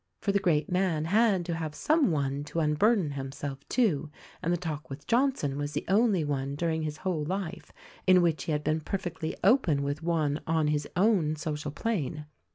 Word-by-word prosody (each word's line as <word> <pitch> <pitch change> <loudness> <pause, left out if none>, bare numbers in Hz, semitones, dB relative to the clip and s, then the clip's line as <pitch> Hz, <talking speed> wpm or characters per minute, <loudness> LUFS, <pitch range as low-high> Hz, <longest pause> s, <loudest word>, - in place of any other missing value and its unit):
For 200 - 0
the 200 - +2
great 160 -6 +1
man 180 -4 +1
had 200 -1 +3
to 170 - -2
have 160 -2 -4
some 310 -4 +2
one 140 -3 -1
to 165 - -3
unburden 165 +3 +2
himself 135 0 -5
to, 170 - +1 0.3
and 170 - 0
the 175 - +2
talk 160 -3 -5
with 140 +2 -8
Johnson 235 - +1
was 145 0 -3
the 150 - -3
only 200 -3 +3
one 140 -1 -2
during 160 +1 -1
his 155 -1 -3
whole 170 -3 -2
life 180 +1 -4 0.4
in 185 -1 +6
which 165 -3 +1
he - - -2
had 150 0 0
been 155 +1 0
perfectly 165 -2 -4
open 185 - +4
with 145 +2 -2
one 160 -3 0
on 160 -2 +2
his 150 -1 0
own 185 -6 +3
social 150 -1 -4
plane. 150 - -2
160 Hz, 190 wpm, -29 LUFS, 150-185 Hz, 0.4 s, in